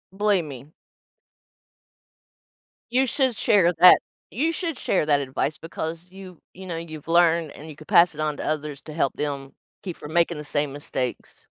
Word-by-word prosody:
believe 205 -3 +2
me. 140 +1 -10 2.2
You 260 +2 +3
should 260 -1 +1
share 185 -6 +3
that 180 +2 +7 0.3
you 310 +9 0
should 330 -5 -3
share 180 - 0
that 145 -2 +3
advice 140 +3 -3
because 165 +1 -6
you 185 -3 -12
you 190 +1 -11
know, 170 -2 -4
you've 160 -2 -8
learned 170 -2 +3
and 155 +2 -11
you 150 - -9
could 155 - -15
pass 170 0 +5
it - - -12
on 150 -1 -1
to - - -5
others 150 -2 -3
to 155 - -9
help 145 -4 0
them 140 -2 -4 0.3
keep 180 -4 -5
from 150 +2 -9
making 170 -1 +2
the - - -6
same 145 -1 -2
mistakes. 130 -3 -5
165 Hz, 175 wpm, -24 LUFS, 150-185 Hz, 2.2 s, that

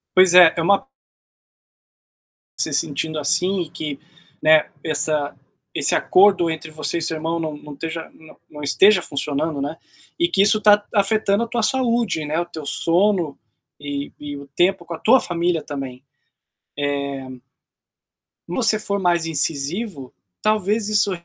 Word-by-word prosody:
Pois 185 -1 +6
é, 180 -2 +8
é - - +1
uma 200 +4 +3 1.8
você - - -2
sentindo 155 +1 -1
assim 180 +6 +1
e 165 - -5
que, 150 -4 -6 0.4
né, 155 0 +4
essa 150 -2 -1 0.4
esse - - +2
acordo 190 -3 +4
entre 160 0 -6
você 155 +2 -3
e - - -3
seu 160 0 -1
irmão 165 +2 -3
não 155 -2 -4
não 150 0 -12
esteja 165 +3 -6
não 160 -1 -17
não 150 - -10
esteja 190 +7 +4
funcionando, 145 0 -3
né, 145 +3 -4 0.4
e 345 - +3
que 195 - +1
isso 210 +2 +5
tá 210 -1 +5
afetando 205 0 +2
a - - -4
tua 235 0 -2
saúde, 235 -9 +1
né, 150 +2 -2
o - - -3
teu 160 -3 -9
sono, 175 0 +1 0.4
e 145 -1 -5
e 145 -1 -7
o 140 0 -11
tempo 180 0 +2
com 170 - -7
a 160 - -7
tua 255 +4 +5
família 170 -1 -1
também. 135 -3 -7 1.2
Eh 130 -1 -11 1.1
se 175 - -5
você 220 -3 +3
for 200 -1 -2
mais 175 -3 +1
incisivo, 155 - -2 0.3
talvez 215 0 0
isso 210 -1 +2
165 Hz, 155 wpm, -21 LUFS, 150-200 Hz, 1.8 s, é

